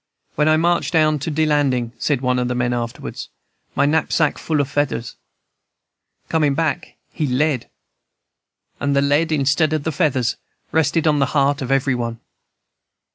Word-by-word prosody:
'When 150 +1 +1
I 155 - +4
march 170 +2 +1
down 155 -3 +2
to 145 - -4
de 155 +1 +1
landin',' 135 -6 +1
said 140 -4 0
one 125 -1 +1
of 125 - 0
the 125 - -2
men 125 0 0
afterwards, 120 -1 -5 0.5
'my 140 - +3
knapsack 160 0 +1
full 155 -2 -1
of 140 - +1
feathers. 140 -5 -2 1.1
Comin' 150 -4 +1
back, 165 +1 -2 0.2
he 155 - -1
lead!' 135 0 0 1.1
And 140 0 0
the 140 - +3
lead, 145 +3 +2
instead 150 +2 +2
of 155 -2 -1
the 160 - -1
feathers, 135 -6 0 0.3
rested 160 +1 +1
on 150 -2 +3
the 135 - +2
heart 140 +1 +2
of 130 - -4
every 135 0 +2
one. 115 -2 -3
145 Hz, 165 wpm, -20 LUFS, 130-155 Hz, 1.1 s, I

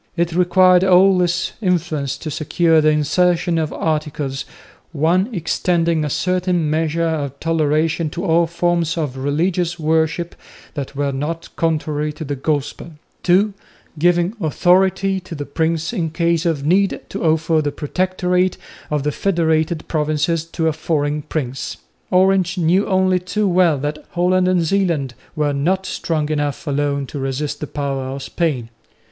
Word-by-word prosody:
It 170 0 0
required 180 +1 +5
all 190 0 +5
his 175 -1 0
influence 155 - -1
to 155 +1 -6
secure 160 +1 +2
the 155 - +4
insertion 170 +3 +2
of 155 -2 -2
articles 150 -3 -2 0.5
(1) 170 - +2
extending 170 -3 0
a 150 - -1
certain 180 -1 0
measure 160 +1 0
of 145 -4 -2
toleration 160 0 +1
to 175 +5 -5
all 170 -1 +3
forms 170 0 0
of 150 -5 -2
religious 170 +6 -1
worship 160 +2 0 0.4
that 140 -1 -6
were 140 0 0
not 150 +5 -4
contrary 155 -2 -1
to 155 +1 -7
the 145 0 -3
Gospel, 145 +3 -3 0.3
(2) 195 +4 +3 0.5
giving 175 +3 +2
authority 190 +4 +2
to 175 -2 -9
the 145 -1 -5
prince 160 +2 -1
in 165 -3 -1
case 170 +1 0
of 150 -4 -1
need 190 +5 +2
to 195 - -5
offer 160 0 +2
the 145 -1 -1
Protectorate 180 +4 0 0.3
of 150 -2 -1
the 150 - 0
federated 160 -3 0
provinces 155 +1 0
to 165 -1 -2
a 160 - +1
foreign 150 -1 -1
prince. 135 -5 -4 0.3
Orange 185 -1 +3
knew 180 +4 +2
only 185 -1 +2
too 200 +3 -1
well 175 -4 +3
that 145 +2 -4
Holland 180 +1 +2
and 180 -2 +2
Zeeland 165 -8 0 0.2
were 150 -2 0
not 185 +7 0
strong 155 -5 -2
enough 145 0 -2
alone 140 -1 -1
to 140 - -7
resist 140 +2 -3
the 150 - -5
power 135 -2 -3
of 135 +1 -5
Spain. 140 -9 -2
165 Hz, 150 wpm, -19 LUFS, 150-180 Hz, 0.5 s, required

